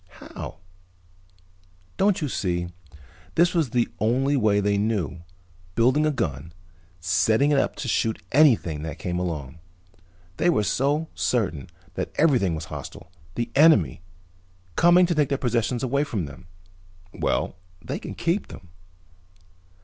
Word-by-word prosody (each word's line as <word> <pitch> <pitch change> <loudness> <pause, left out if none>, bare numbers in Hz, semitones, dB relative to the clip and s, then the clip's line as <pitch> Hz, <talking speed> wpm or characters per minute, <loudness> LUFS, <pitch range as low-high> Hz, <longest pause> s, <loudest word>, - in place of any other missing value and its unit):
"How?" - - -8 1.4
"Don't 195 -2 +2
you - - 0
see? 85 -7 -2 0.7
This 170 +1 +4
was 165 -7 +1
the 120 0 +1
only 130 +6 +2
way 105 -6 +3
they 100 0 +1
knew, 95 - -1 0.5
building 130 +7 +3
a - - +2
gun 115 - -1
and 80 +3 -14 0.5
setting 95 - +2
it 140 - +4
up - - 0
to 135 - -5
shoot 110 -1 0
anything 120 - +4
that 80 -2 -5
came 90 -1 -3
along. 80 -4 -4 0.8
They 175 - +2
were 105 -11 +2
so 145 - 0
certain 85 - -1 0.3
that - - -4
everything 125 - +3
was 80 +1 -5
hostile, 90 - -9 0.2
the 120 0 -3
enemy, 135 - +4 0.7
coming 175 +2 +6
to 175 - 0
take 150 -3 +1
their 140 - 0
possessions 120 -1 -1
away 140 +3 +1
from 110 - -3
them. 70 +5 -12 0.7
Well, - - -1 0.2
they - - -5
can - - -7
keep 175 +4 -1
them." 90 - -12
115 Hz, 140 wpm, -24 LUFS, 90-145 Hz, 1.4 s, coming